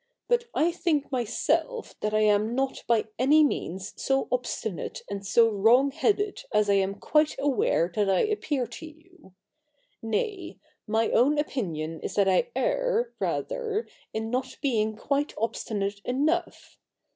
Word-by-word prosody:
But 480 -1 +2
I 330 +3 +3
think 320 -5 -1
myself 270 - -1
that 210 - -1
I 215 0 +2
am 215 +2 +2
not 270 0 -1
by 230 -2 +3
any 295 +5 +5
means 190 - -2
so 270 0 +1
obstinate 235 -6 -3
and 200 -1 -4
so 230 +4 +4
wrong 225 +6 +4
headed 415 - 0
as 210 -1 +3
I - - +4
am 195 0 +1
quite 300 +8 +2
aware 265 - +1
that 205 0 +1
I 190 - +3
appear 310 - -1
to 235 +7 -9
you; 320 - -19 0.7
nay, 360 - -3 0.3
my 225 +1 +1
own 280 +6 +4
opinion 165 - -3
is - - -5
that 200 -2 +3
I 190 - +2
err, - - 0
rather, 470 -3 -2 0.2
in 220 +1 -3
not 255 +1 -2
being 220 -6 0
quite 280 +6 -1
obstinate 205 -2 -2
enough. 310 +7 -1
255 Hz, 145 wpm, -27 LUFS, 210-315 Hz, 0.7 s, any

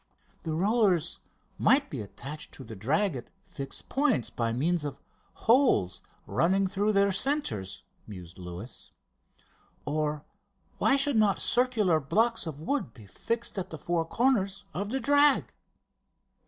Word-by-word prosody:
"The 160 - -3
rollers 190 -3 +2 0.4
might 280 +2 +3
be 130 - -3
attached 140 +9 -7
to 135 - -9
the 110 -3 -9
drag 150 - +1
at 120 - -7 0.2
fixed 135 -1 -4
points 270 - +1
by 115 -1 -1
means 155 +7 0
of 140 -2 -5 0.5
holes 225 - +3 0.2
running 190 +3 +2
through 205 +3 0
their 200 0 +3
centres," 190 - -1 0.2
mused 90 -4 -10
Luis. 90 +6 -8 1.0
"Or 150 0 -2 0.5
why - - +4
should 275 -2 +2
not 210 -3 +3
circular 225 -10 +2
blocks 225 +8 +1
of 150 -3 -6
wood 165 - -2
be 110 -4 -13
fixed 230 - -2
at 185 - -4
the 160 - -7
four 170 +2 -1
corners 200 0 0
of 200 +3 -3
the 265 +4 0
drag?... 285 +2 +3
180 Hz, 140 wpm, -28 LUFS, 135-230 Hz, 1.0 s, why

